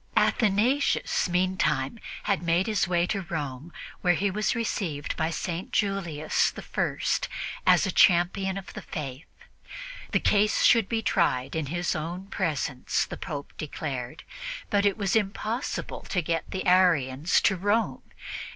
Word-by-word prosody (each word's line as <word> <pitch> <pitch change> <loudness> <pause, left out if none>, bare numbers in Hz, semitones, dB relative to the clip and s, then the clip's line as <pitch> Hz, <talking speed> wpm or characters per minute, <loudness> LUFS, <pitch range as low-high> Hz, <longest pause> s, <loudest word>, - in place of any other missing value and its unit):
Athanasius, 235 +7 +2
in - - -7
the 180 - +3
meantime, 180 - 0 0.2
had 200 -4 +1
made 170 +2 +2
his 215 -5 +1
way 175 -1 +2
to 195 +2 -2
Rome, 150 -3 -5 0.3
where 180 -1 +3
he 195 +4 0
was 215 +5 0
received 180 -10 -2
by 160 0 0
St. 170 +2 -4
Julius 170 -7 +1 0.2
I - - 0 0.7
as - - +6
a - - 0
champion 190 +2 +3
of 195 - -8
the - - -6
Faith. 145 -2 -6 0.8
The - - +3
case 210 0 +3
should 230 -4 +5
be 225 -1 -1
tried 165 - +1
in 160 -3 -1
his 175 +5 -1
own 170 +4 -4
presence, 145 -9 -1
the - - -7
Pope 145 -5 -6
declared; 135 -5 -5 0.5
but 205 -1 +3
it 200 - 0
was 200 -2 0
impossible 220 +4 -2
to 180 -3 0
get 165 +1 -2
the 190 - -4
Arians 165 -5 +4
to 195 - +3
Rome. 205 +5 0
180 Hz, 150 wpm, -27 LUFS, 155-200 Hz, 0.8 s, as